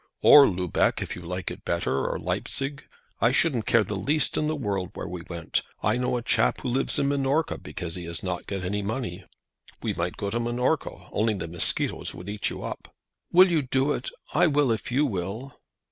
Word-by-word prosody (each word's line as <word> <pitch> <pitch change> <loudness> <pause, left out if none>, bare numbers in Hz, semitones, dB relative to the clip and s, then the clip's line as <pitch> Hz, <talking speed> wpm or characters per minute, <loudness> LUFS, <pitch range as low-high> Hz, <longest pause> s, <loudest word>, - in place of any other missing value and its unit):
"Or 145 -2 +10
Lubeck, 90 -3 +1
if - - -5
you 90 - -8
like 90 0 -4
it - - -9
better; 70 -6 0
or - - -2
Leipsig. 140 +2 -3 0.3
I 115 - +4
shouldn't 130 -5 +2
care 115 -1 +5
the 105 +1 -4
least 140 +10 +1
in 150 - +1
the 155 - 0
world 100 - -2
where - - -5
we 90 0 -6
went. 85 -2 -1 0.2
I 105 +3 +2
know 125 0 0
a 120 - -4
chap - - +2
who 130 - -2
lives 130 +3 +1
in 140 - +2
Minorca 140 +3 +1
because 85 -2 -6
he 90 0 -6
has 85 -2 -5
not 90 -2 -3
got 95 -2 -3
any 105 +3 -1
money. 100 -3 -4 0.6
We - - 0
might 85 +1 -3
go 100 -1 -3
to 120 - 0
Minorca, 120 +6 -1
only 110 0 +1
the 95 - -4
mosquitoes 85 +1 0
would 90 +3 -8
eat 105 0 -1
you - - -6
up." - - -7 0.4
"Will 185 +1 +7
you 160 -3 +3
do 135 +2 +1
it? - - -4 0.2
I - - +5
will 145 -4 +3
if 110 +2 -2
you 140 +5 +3
will." 110 +4 -4
110 Hz, 210 wpm, -26 LUFS, 90-135 Hz, 0.6 s, Or